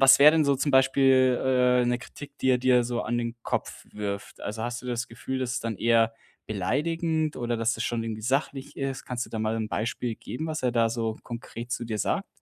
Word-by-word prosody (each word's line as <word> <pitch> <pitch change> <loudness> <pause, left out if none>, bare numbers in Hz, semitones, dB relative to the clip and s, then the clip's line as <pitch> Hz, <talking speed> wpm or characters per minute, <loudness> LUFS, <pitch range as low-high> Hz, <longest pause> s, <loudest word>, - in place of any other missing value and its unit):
was 135 0 +8
wäre 150 +2 +9
denn 160 -1 +3
so 140 -1 +3
zum 140 +1 0
Beispiel, 130 -1 +5
äh, 125 -1 +4
'ne 120 0 +1
Kritik, 140 +3 -11
die 130 - 0
er 125 - +4
dir 125 -1 +4
so 120 0 -2
an 120 - -1
den 115 0 -3
Kopf - - -3
wirft? 100 -1 -5
Also, 110 +2 -4
hast 120 +1 -4
du - - -9
das 120 -2 -2
Gefühl, 130 +3 -5
dass 125 -1 -2
es - - -2
dann 115 -3 -3
eher 115 0 +3 0.4
beleidigend 155 - 0
oder 120 -1 -1
dass 115 +1 +1
das - - -3
schon 115 -1 -1
irgendwie 110 -1 -4
sachlich 135 +2 -1
ist? 135 -1 -3
Kannst 120 -1 -3
du - - -16
da 110 - -3
mal 110 +1 0
'n 110 -1 -2
Beispiel 115 +1 -2
geben, 145 +9 -6
was 155 -2 -3
er 125 - +2
da 115 -1 +3
so 115 -1 -2
konkret 120 0 -7
zu 120 - -2
dir 110 -2 -3
sagt? - - -1
120 Hz, 235 wpm, -27 LUFS, 115-135 Hz, 0.4 s, wäre